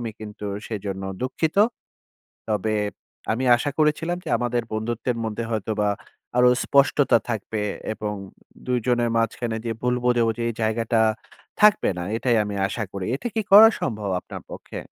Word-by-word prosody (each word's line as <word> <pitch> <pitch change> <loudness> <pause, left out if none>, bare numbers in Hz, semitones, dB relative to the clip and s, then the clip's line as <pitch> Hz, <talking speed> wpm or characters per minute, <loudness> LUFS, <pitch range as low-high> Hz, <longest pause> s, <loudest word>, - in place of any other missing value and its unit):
আমি 115 -2 -3
কিন্তু 105 -1 -7 0.2
সেজন্য 100 -3 -4 0.2
দুঃখিত। 155 +6 -1 0.9
তবে 110 0 0 0.6
আমি 125 +4 -1
আশা 145 +4 -2
করেছিলাম 155 +3 +1
যে - - -6
আমাদের 120 -1 0
বন্ধুত্বের 115 +2 -2
মধ্যে 110 +1 -3
হয়তোবা 105 -1 0 0.5
আরো 125 0 +6 0.2
স্পষ্টতা 140 -2 +4
থাকবে। 110 -1 -3 0.3
এবং 105 0 -4
উম - - -18 0.3
২ 125 -1 +1
জনের 120 -1 +2
মাঝখানে 115 0 -1
যে - - -1
ভুল 125 0 +2
বোঝাবুঝি, 120 -2 +2
এই - - -1
জায়গাটা 115 +1 +1 0.6
থাকবে 210 0 +5
না। - - -3
এটাই 120 0 +1
আমি 105 0 -4
আশা 110 +1 -3
করি।" 95 -2 -4
এটা 240 - -7
কি 220 - +1
করা 220 +2 +11
সম্ভব 105 -5 -2
আপনার - - -9
পক্ষে? - - -8
115 Hz, 155 wpm, -24 LUFS, 110-125 Hz, 0.9 s, করা